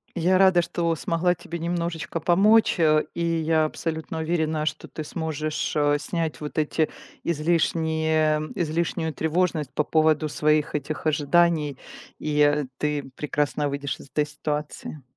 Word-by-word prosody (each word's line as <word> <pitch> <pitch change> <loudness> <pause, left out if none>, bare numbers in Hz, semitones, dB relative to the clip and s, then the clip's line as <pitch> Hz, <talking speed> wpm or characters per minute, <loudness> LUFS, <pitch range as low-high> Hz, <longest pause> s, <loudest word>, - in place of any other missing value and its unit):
Я 180 +2 +3
рада, 185 -2 +5
что 170 -1 -1
смогла 170 +3 0
тебе 170 0 -7
немножечко 170 -1 -2
помочь, 200 +6 +4
э, 155 -2 +4
и 170 - -2
я 160 -1 +2
абсолютно 160 +1 -4
уверена, 160 -1 0
что 155 0 -3
ты 155 - -6
сможешь, 155 -1 -3
э, 145 -1 +3
снять 160 0 -3
вот 150 +1 -6
эти 155 +1 +1 0.3
излишние 160 -1 +1 0.2
излишнюю 160 -1 -1
тревожность 160 -2 0
по 150 - +1
поводу 155 0 +2
своих 150 0 +1
этих 150 +2 -4
ожиданий, 155 -1 +2 0.4
и, 150 -1 -1
э, 145 0 +4
ты 150 -1 -1
прекрасно 145 -1 -1
выйдешь 140 -1 -4
из - - -12
этой 150 +2 0
ситуации. 150 0 -5
155 Hz, 140 wpm, -25 LUFS, 150-170 Hz, 0.4 s, рада